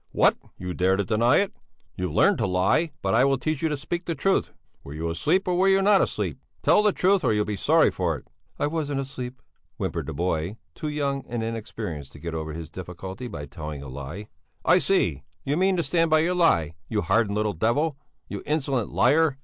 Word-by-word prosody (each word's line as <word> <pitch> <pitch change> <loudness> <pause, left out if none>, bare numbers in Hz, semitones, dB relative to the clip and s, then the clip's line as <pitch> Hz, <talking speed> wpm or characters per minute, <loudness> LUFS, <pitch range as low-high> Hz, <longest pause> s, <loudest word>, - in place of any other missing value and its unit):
"What, - - +4 0.2
you 90 0 -5
dare 95 +1 +2
to 100 - +1
deny 115 +3 +3
it? 200 0 +1 0.4
You've 90 -2 -3
learned - - +4
to - - +1
lie, 95 - +2
but 95 - +1
I 120 +3 +5
will 135 0 +3
teach 145 +3 -2
you 160 - +1
to 150 - -1
speak 170 +5 -4
the 165 - -2
truth! 195 +3 +1 0.3
Were 70 - -8
you 80 +2 -2
asleep 155 - +1
or 180 - +2
were 185 +2 +3
you 195 0 +5
not 200 0 +5
asleep? - - -2 0.2
Tell - - +5
the 210 -1 +4
truth 190 0 +2
or - - +3
you'll 105 0 +1
be 105 - -2
sorry 160 - +4
for 85 -5 -1
it." - - -16 0.3
"I - - 0
wasn't 145 -2 -1
asleep," 130 -2 -6 0.4
whimpered - - -3
the 80 - -4
boy, 85 +4 -1 0.2
too 155 - -5
young 140 -2 -1
and 120 -2 -3
inexperienced 105 -10 -5
to 75 - -12
get 85 +2 -5
over 80 -1 -4
his 80 0 -6
difficulty 95 - -7
by 75 -10 -6
telling 75 0 -7
a 70 - -8
lie. 70 +10 -7 0.4
"I 180 - +6
see, 90 - +1 0.2
you 140 - +1
mean 190 +2 +2
to 170 - +1
stand 165 +3 +2
by 155 0 +5
your 175 +3 +1
lie, 85 - +3 0.2
you 105 -2 0
hardened 105 0 +2
little 105 -1 0
devil! 120 - +1 0.3
You - - -5
insolent 135 -7 0
liar!" 155 -2 +3
115 Hz, 220 wpm, -25 LUFS, -, 0.4 s, I